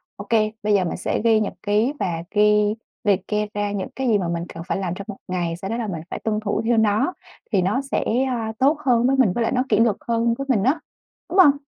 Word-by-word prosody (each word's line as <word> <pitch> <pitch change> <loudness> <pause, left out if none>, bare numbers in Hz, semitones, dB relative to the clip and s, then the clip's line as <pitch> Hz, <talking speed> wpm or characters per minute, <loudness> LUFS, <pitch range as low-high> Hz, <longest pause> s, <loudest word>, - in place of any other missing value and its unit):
Ô 200 - -8
kê, 215 -2 +3
bây 210 0 +2
giờ 195 -2 +3
mình - - -3
sẽ 180 - -2
ghi 225 -1 +4
nhật 215 - -2
ký 210 +7 +1
và 170 -4 -2
ghi 210 0 +3 0.3
liệt 200 -2 +1
kê 210 0 0
ra 205 0 -1
những 200 +3 -3
cái 265 -1 -2
gì 220 - +4
mà 185 -4 -2
mình 170 0 -2
cần 165 - -7
phải - - -1
làm 185 -3 -2
trong 200 - -7
một 205 - -6
ngày. 175 -2 -2
Sau 195 +2 -6
đó 230 - -2
là 230 -3 -3
mình 170 -5 -4
phải - - -5
tuân 215 -1 -1
thủ 210 0 -1
theo 235 0 +2
nó, 220 - +2 0.4
thì 195 -4 +3
nó 205 +9 +1
sẽ, 275 - -2 0.2
ơ, 255 -2 -1 0.2
tốt 285 +4 +4
hơn 245 -1 +3
với 270 - +3
mình, 220 -9 +4
với 240 - -2
lại - - 0
nó 250 - +1
kỷ 210 - +3
luật 225 -3 +3
hơn 230 0 +2
với 275 0 -5
mình 215 -6 +2
á, 280 +6 +2 0.5
đúng 385 - +1
hông? 285 -6 +7
210 Hz, 270 wpm, -22 LUFS, 200-235 Hz, 0.5 s, hông